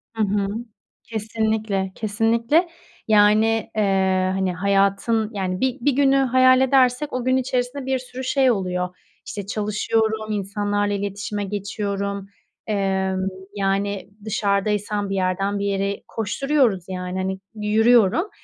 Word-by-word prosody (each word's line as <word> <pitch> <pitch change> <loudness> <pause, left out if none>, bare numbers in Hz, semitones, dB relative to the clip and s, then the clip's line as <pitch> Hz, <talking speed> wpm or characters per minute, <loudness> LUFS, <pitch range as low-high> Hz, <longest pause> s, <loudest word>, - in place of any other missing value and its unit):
Hı 220 - +1
hı. 200 0 0 0.6
Kesinlikle, 220 -3 -2
kesinlikle. 230 - +1 0.4
Yani, 215 +1 +4
eee, 190 -3 +2
hani, 190 -1 0
hayatın, 200 +4 +1
yani, 185 -2 -2
bir 260 -1 +1
bir 285 - +3
günü 275 0 +3
hayal 255 -1 +5
edersek 265 +1 +3
o 255 -1 -2
gün 255 0 +3
içerisinde 255 +1 -2
bir 265 -1 0
sürü 255 +1 -8
şey 265 0 +3
oluyor. 180 -3 -2 0.3
İşte, 205 -2 -6
çalışıyorum, 215 +1 -1
insanlarla 205 0 -1
iletişime 205 +1 -3
geçiyorum. 200 0 -3 0.4
Emm, 190 -2 0 0.3
yani, 200 0 -1 0.2
dışarıdaysam 205 -1 0
bir 195 - -1
yerden 195 +2 0
bir 200 - -2
yere 200 0 -1
koşturuyoruz, 230 - 0
yani, 180 0 -4
hani, 190 0 -2 0.2
yürüyorum. 225 - +3
205 Hz, 120 wpm, -22 LUFS, 195-230 Hz, 0.6 s, hayal